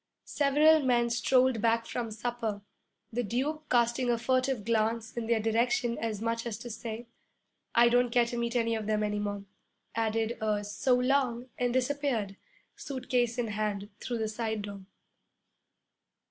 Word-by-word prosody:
Several 300 +2 +4
men 240 -3 +2
strolled 255 -1 +3
back 230 0 +2
from 235 0 -3
supper. 220 -2 -3 0.5
The 245 - 0
Duke 280 +8 -2
casting 240 +1 +2
a 240 - +3
furtive 255 -1 0
glance 225 0 0
in 235 -2 -3
their 230 -1 +2
direction 235 +2 +1
as 220 -2 -3
much 230 +1 -1
as 225 - -4
to 240 - -8
say, 230 +1 -6 0.7
'I 235 0 +7
don't 245 +1 +3
care 240 0 +4
to 235 - -5
meet 235 0 -2
any 230 -1 +2
of 220 -2 -3
them 215 -1 +1
any 210 0 -1
more,' 205 -1 -3 0.5
added 225 +1 -1
a 210 -1 0
'So 210 +5 +1
long,' 250 -1 +1
and 245 -1 +1
disappeared, 255 -5 0 0.4
suitcase 250 -3 -1
in 235 -2 -1
hand, 205 -1 -2
through 240 - -3
the 220 -1 -1
side 220 -1 -3
door. 200 -1 -7
235 Hz, 160 wpm, -30 LUFS, 220-245 Hz, 0.7 s, I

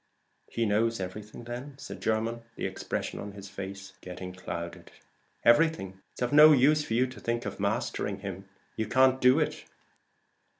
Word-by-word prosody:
"He 115 - -1
knows 110 +2 +1
everything 105 +5 -7
then?" 125 +4 -7
said 140 - -9
Jermyn, 115 +1 0
the - - -4
expression - - -4
of 100 0 -7
his 100 0 -9
face 100 0 -7
getting 90 0 -7
clouded. 85 -2 -7 0.5
"Everything. 120 - +3
It's - - -4
of 125 - -1
no 155 +1 +9
use 150 +3 +4
for 115 - -2
you 125 +2 +4
to 125 -4 -9
think 120 +2 -2
of - - -5
mastering 100 -1 -1
him: 95 0 -7 0.3
you 110 -1 -2
can't 130 +2 +4
do 125 +4 +6
it. 155 - -2
115 Hz, 165 wpm, -29 LUFS, 100-130 Hz, 0.5 s, no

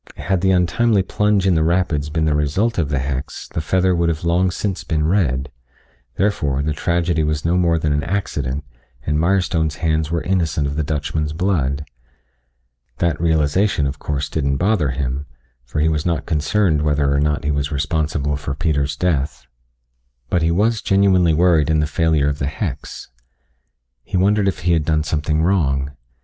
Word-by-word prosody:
Had 95 -3 -1
the 95 - +2
untimely 95 +3 +2
plunge 105 0 +1
in 95 - +4
the 80 - +2
rapids 80 -3 0
been 80 +1 0
the 75 - +2
result 80 +10 0
of 75 -5 0
the 70 - 0
hex 65 +1 -4
the - - -3
feather 95 +3 +1
would 85 -1 +1
have 80 -1 -3
long 85 +2 +2
since 95 +1 -3
been 75 -2 -1
red, 70 -8 0 0.6
therefore, 75 -9 0
the 75 +1 -1
tragedy 85 +1 0
was 75 0 -1
no 85 +2 +2
more 85 -2 +2
than 75 -2 0
an 75 - 0
accident 75 -6 -3 0.4
and 75 0 0
Mirestone's 85 -3 +1
hands 80 -1 0
were 85 -1 -1
innocent 80 -5 0
of 70 0 -3
the 80 - 0
Dutchman's 75 +1 -2
blood. 75 -6 -1 1.1
That 85 -2 0
realization, 80 +1 +2
of 70 +1 -3
course, 70 -1 -2
didn't 70 -3 -1
bother 90 -5 +1
him, 65 +1 -3 0.4
for 65 +5 -4
he 75 - +3
was 75 -2 0
not 85 -3 -1
concerned 80 +1 +1
whether 75 -2 +1
or 70 - +2
not 75 0 0
he 75 - 0
was 70 0 -1
responsible 75 0 -1
for 70 -1 -4
Peter's 70 -3 0
death, 75 -5 -1 0.9
but 90 - +2
he 80 - +2
was 110 +6 +1
genuinely 95 -4 +3
worried 85 -3 +3
in 80 -1 +2
the 75 - +2
failure 75 -1 +1
of 75 0 -2
the 70 - -1
hex. 75 - -5 0.9
He - - -3
wondered 100 +2 +2
if 95 - -1
he 85 0 +2
had 80 -2 +2
done 75 0 +1
something 75 +1 0
wrong. 70 -7 +1
80 Hz, 180 wpm, -20 LUFS, 75-90 Hz, 1.1 s, in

